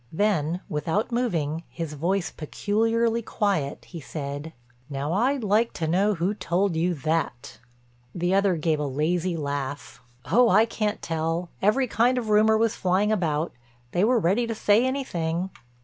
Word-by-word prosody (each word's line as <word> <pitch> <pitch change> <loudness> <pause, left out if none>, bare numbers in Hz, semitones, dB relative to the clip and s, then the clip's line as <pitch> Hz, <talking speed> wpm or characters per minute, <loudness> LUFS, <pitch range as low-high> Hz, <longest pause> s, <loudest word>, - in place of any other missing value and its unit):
Then, 175 -3 0
without 175 +6 -1
moving, 165 -11 -1
his 165 -3 -5
voice 175 +5 -1
peculiarly 225 +8 0
quiet, 200 -10 -1
he 170 - -9
said: 145 +2 -6 0.4
"Now 140 +3 -2
I'd 250 +6 +1
like 215 +3 +2
to 160 - -3
know 195 +5 +2
who 180 +4 0
told 185 -1 0
you 175 +2 +1
that?" 150 -6 -2 0.6
The 175 +1 0
other 195 -2 +3
gave 155 -1 0
a 150 - -1
lazy 165 +5 0
laugh: 140 -2 -4 0.2
"Oh, 235 - +4
I 215 +4 +5
can't 215 -2 -2
tell—every 170 +9 0
kind 245 +2 +2
of 230 -3 -2
rumor 215 +1 +5
was 225 +1 +1
flying 190 +3 +1
about. 165 -5 0 0.4
They 175 - +1
were 245 +3 +4
ready 210 +4 +2
to 225 - -3
say 215 +4 +3
anything." 180 -10 -2
180 Hz, 150 wpm, -25 LUFS, 160-215 Hz, 0.6 s, I